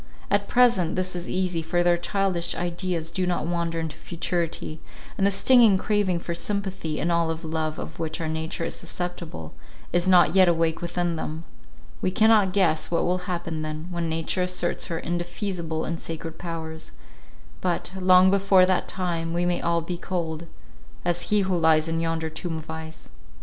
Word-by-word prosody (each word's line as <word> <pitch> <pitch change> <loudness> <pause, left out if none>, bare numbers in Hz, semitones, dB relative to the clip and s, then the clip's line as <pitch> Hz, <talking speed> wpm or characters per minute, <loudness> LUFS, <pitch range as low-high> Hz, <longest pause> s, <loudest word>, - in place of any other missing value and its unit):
At 200 0 +2
present 235 -9 +3
this 185 0 -1
is 175 0 -4
easy, 185 -3 0
for 175 +2 0
their 175 0 +4
childish 180 0 -1
ideas 175 -1 -2
do 185 +1 -1
not 175 -3 0
wander 170 -1 -1
into 160 -1 -4
futurity, 170 -2 -3 0.4
and 195 - +2
the - - +4
stinging 225 0 +5
craving 205 -3 +1
for 170 0 -4
sympathy, 190 -3 -3
and 170 - 0
all 170 -1 +2
of 165 +1 -4
love 155 -1 -2
of 160 - -7
which 160 -1 -3
our 165 - -2
nature 160 +1 -3
is - - -2
susceptible, 170 - -5 0.4
is 175 +1 +2
not 180 -2 +6
yet 190 -2 +6
awake 165 -1 +1
within 175 -1 -1
them: 155 +1 -4 0.6
we - - +1
cannot 215 0 +4
guess 175 -5 +2
what 170 - +1
will 180 +1 +1
happen 170 -3 -3
then, 155 +2 -5
when 170 -1 -2
nature 165 +3 -1
asserts 180 -1 -1
her 170 -2 -3
indefeasible 175 -1 -3
and 165 0 -3
sacred 165 0 -7
powers; 160 -2 -6 0.7
but, - - -1
long 185 0 +6
before 195 -1 +5
that 185 -1 +1
time, 170 -3 -2
we 175 0 +1
may 175 0 0
all 170 0 +1
be 170 +1 -5
cold, 170 -3 -3 0.6
as 175 0 -1
he 210 -1 +4
who 190 -1 0
lies 160 -1 +3
in 165 0 -1
yonder 165 -1 -1
tomb 165 +1 -4
of 160 0 -8
ice. 160 - -8
175 Hz, 180 wpm, -25 LUFS, 165-185 Hz, 0.7 s, not